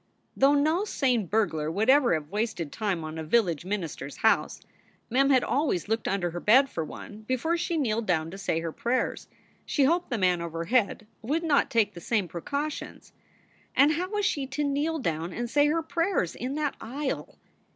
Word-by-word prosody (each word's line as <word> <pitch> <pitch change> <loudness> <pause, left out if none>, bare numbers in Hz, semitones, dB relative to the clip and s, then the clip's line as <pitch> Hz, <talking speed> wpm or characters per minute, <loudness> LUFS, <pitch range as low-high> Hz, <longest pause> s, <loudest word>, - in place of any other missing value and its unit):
Though 275 +2 +4
no 310 +6 +2
sane 250 - 0
burglar 160 -7 0
would 200 +7 -1
ever 265 - +5
have 150 -1 -5
wasted 205 -7 -2
time 200 -7 -2
on 155 +1 -6
a - - -4
village 170 -3 +1
minister 185 -8 -4
s 140 - -10
house, 220 - +2 0.5
Mem 275 +3 +3
had 260 -2 +4
always 270 - 0
looked 225 +1 -1
under 185 -3 0
her 175 - -4
bed 260 +9 +5
for 160 - -2
one 210 +6 -9
before 260 +7 0
she 340 0 -1
kneeled 230 -6 0
down 165 -3 0
to 195 - -8
say 165 -4 -1
her 165 -1 -3
prayers. 240 +9 -1 0.4
She 285 - +1
hoped 340 +6 +2
the 245 - -1
man 180 -3 +2
overhead 170 +7 0 0.2
would 295 +9 -1
not 300 -4 +2
take 215 -3 +2
the 170 - -10
same 210 -1 0
precautions. 280 - -5 0.6
And 280 +3 +6
how 360 +4 -2
was 415 -1 -1
she 280 -7 0
to 275 +3 -2
kneel 290 +3 0
down 165 - -2
and 240 0 -3
say 290 +4 +3
her 325 +2 +1
prayers 335 - 0
in 260 +3 -4
that 300 -2 -1
aisle? 265 +5 -4
235 Hz, 195 wpm, -27 LUFS, 175-290 Hz, 0.6 s, And